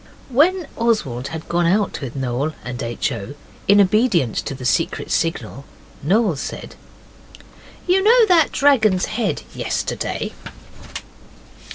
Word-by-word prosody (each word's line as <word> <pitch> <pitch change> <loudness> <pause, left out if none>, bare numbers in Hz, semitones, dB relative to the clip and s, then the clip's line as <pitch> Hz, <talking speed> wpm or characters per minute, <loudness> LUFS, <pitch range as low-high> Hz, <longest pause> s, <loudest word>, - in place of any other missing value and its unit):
When 325 +6 +2
Oswald 165 - 0
had 160 +1 -7
gone 175 0 +1
out 200 +1 0
with 135 -2 -6
Noel 135 +3 -2
and 125 +1 -5
H. 115 -2 -2
O. 120 +9 -6 0.3
in 200 +1 +6
obedience 200 - +2
to 135 - -5
the 130 -1 -8
secret 165 +6 0
signal, 165 -4 -2 0.4
Noel 195 +3 +2
said - - -6 1.1
'You 370 +2 +3
know 460 +3 +6
that 340 -7 +4
dragon's 220 -10 +3
head 225 +2 -2
yesterday? - - -3
185 Hz, 125 wpm, -20 LUFS, -, 1.1 s, in